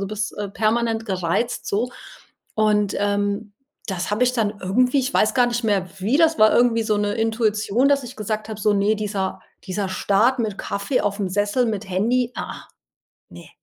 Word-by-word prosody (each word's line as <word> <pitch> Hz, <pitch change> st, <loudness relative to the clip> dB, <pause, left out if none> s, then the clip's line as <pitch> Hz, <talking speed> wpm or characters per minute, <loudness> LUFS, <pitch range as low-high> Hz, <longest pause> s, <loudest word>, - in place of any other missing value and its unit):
du 195 Hz, -, -2 dB
bist 210 Hz, 0 st, -3 dB, 0.2 s
permanent 225 Hz, 0 st, 0 dB
gereizt.“ 190 Hz, +5 st, -1 dB
So. 235 Hz, +5 st, -1 dB, 0.6 s
Und, 210 Hz, -2 st, +2 dB
ähm, 205 Hz, +1 st, -1 dB, 0.4 s
das 190 Hz, 0 st, -3 dB
habe 210 Hz, +4 st, 0 dB
ich 250 Hz, -, +1 dB
dann 220 Hz, -3 st, 0 dB
irgendwie 250 Hz, +8 st, +2 dB
ich 260 Hz, +2 st, -2 dB
weiß 215 Hz, 0 st, +3 dB
gar 245 Hz, -1 st, +4 dB
nicht 240 Hz, 0 st, -1 dB
mehr 200 Hz, -4 st, +1 dB
wie 220 Hz, +9 st, +2 dB
das 325 Hz, -1 st, +3 dB
war 215 Hz, 0 st, +6 dB
irgendwie 235 Hz, -2 st, +3 dB
so 215 Hz, -1 st, +1 dB
'ne 205 Hz, 0 st, 0 dB
Intuition, 225 Hz, +1 st, +1 dB
dass 280 Hz, -1 st, +3 dB
ich 245 Hz, -, -9 dB
gesagt 215 Hz, +1 st, -3 dB
habe 215 Hz, -, -6 dB
so: 210 Hz, -, +3 dB
„Ne, 205 Hz, +2 st, +2 dB
dieser 200 Hz, -2 st, -3 dB, 0.2 s
dieser 195 Hz, 0 st, -3 dB
Start 215 Hz, +7 st, +2 dB
mit 210 Hz, -3 st, -2 dB
Kaffee 200 Hz, +6 st, -1 dB
aufm 200 Hz, -1 st, -1 dB
Sessel, 205 Hz, +6 st, +1 dB
mit 210 Hz, -2 st, -3 dB
Handy, 235 Hz, +6 st, +1 dB
ah, -, -, -3 dB
ah, -, -, -12 dB, 0.6 s
ne.“ -, -, -13 dB
215 Hz, 185 wpm, -22 LUFS, 200-235 Hz, 0.6 s, war